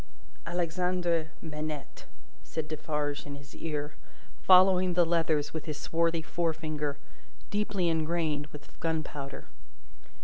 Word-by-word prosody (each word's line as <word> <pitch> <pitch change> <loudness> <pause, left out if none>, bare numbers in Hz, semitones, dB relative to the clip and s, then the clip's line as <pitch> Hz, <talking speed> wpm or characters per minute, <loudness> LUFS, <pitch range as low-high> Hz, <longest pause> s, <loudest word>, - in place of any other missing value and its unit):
"Alexandre 175 -1 +1
Manette," 150 -2 -5 0.4
said 160 -1 -4
Defarge 150 -2 -2
in 140 - -5
his 140 0 -12
ear, 150 -1 -3 0.5
following 185 -1 +6
the 175 -1 +6
letters 165 -3 +2
with 160 - -4
his 155 -3 -3
swart 165 +1 +1
forefinger, 155 -3 -1 0.5
deeply 205 -3 +1
engrained 160 -2 +1
with 150 -1 -13
gunpowder. 155 -4 -3
160 Hz, 105 wpm, -30 LUFS, 150-170 Hz, 0.5 s, following